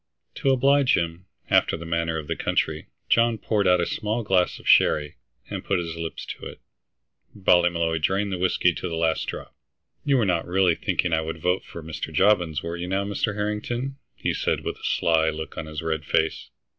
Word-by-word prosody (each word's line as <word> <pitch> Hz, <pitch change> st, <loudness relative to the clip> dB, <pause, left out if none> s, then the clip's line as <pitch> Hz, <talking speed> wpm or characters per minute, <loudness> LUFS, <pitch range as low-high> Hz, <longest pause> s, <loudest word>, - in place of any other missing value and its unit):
To 135 Hz, -, 0 dB
oblige 135 Hz, +1 st, +4 dB
him, 85 Hz, +2 st, -3 dB, 0.2 s
after -, -, +3 dB
the 85 Hz, -, -8 dB
manner 85 Hz, -1 st, -1 dB
of 80 Hz, -, -5 dB
the -, -, -2 dB
country, -, -, -1 dB, 0.2 s
John 115 Hz, 0 st, +3 dB
poured 105 Hz, -2 st, 0 dB
out 90 Hz, 0 st, +5 dB
a 85 Hz, -, +1 dB
small 110 Hz, +6 st, -2 dB
glass 95 Hz, -3 st, +2 dB
of -, -, -13 dB
sherry, 75 Hz, +1 st, +4 dB, 0.3 s
and -, -, -5 dB
put 100 Hz, -, 0 dB
his 85 Hz, -2 st, -4 dB
lips 80 Hz, -1 st, -5 dB
to -, -, -7 dB
it. -, -, -11 dB, 0.8 s
Ballymolloy 85 Hz, -4 st, +2 dB
drained 100 Hz, +5 st, 0 dB
the 90 Hz, -, -3 dB
whiskey 90 Hz, -1 st, +2 dB
to 90 Hz, -, -4 dB
the 85 Hz, -, -3 dB
last 80 Hz, -1 st, 0 dB
drop. -, -, -6 dB, 0.5 s
"You 140 Hz, -2 st, +3 dB
were 115 Hz, -, +2 dB
not 90 Hz, -3 st, 0 dB
really 90 Hz, -1 st, +3 dB
thinking 85 Hz, +1 st, -1 dB
I 80 Hz, -, +3 dB
would 80 Hz, 0 st, -5 dB
vote 90 Hz, +3 st, 0 dB
for 85 Hz, -, -10 dB
Mr. 80 Hz, 0 st, -5 dB
Jobbins, 85 Hz, -3 st, +2 dB
were 85 Hz, +1 st, -4 dB
you 90 Hz, +1 st, -4 dB
now, 95 Hz, +2 st, 0 dB
Mr. 100 Hz, +1 st, -1 dB
Harrington?" 115 Hz, +6 st, -3 dB, 0.2 s
he -, -, -1 dB
asked, -, -, -1 dB
with -, -, -4 dB
a -, -, -18 dB
sly 80 Hz, -1 st, +2 dB
look 80 Hz, 0 st, -6 dB
on 80 Hz, -, -5 dB
his 75 Hz, +1 st, -6 dB
red 80 Hz, -1 st, -2 dB
face. 80 Hz, +1 st, 0 dB
90 Hz, 205 wpm, -24 LUFS, 80-100 Hz, 0.8 s, out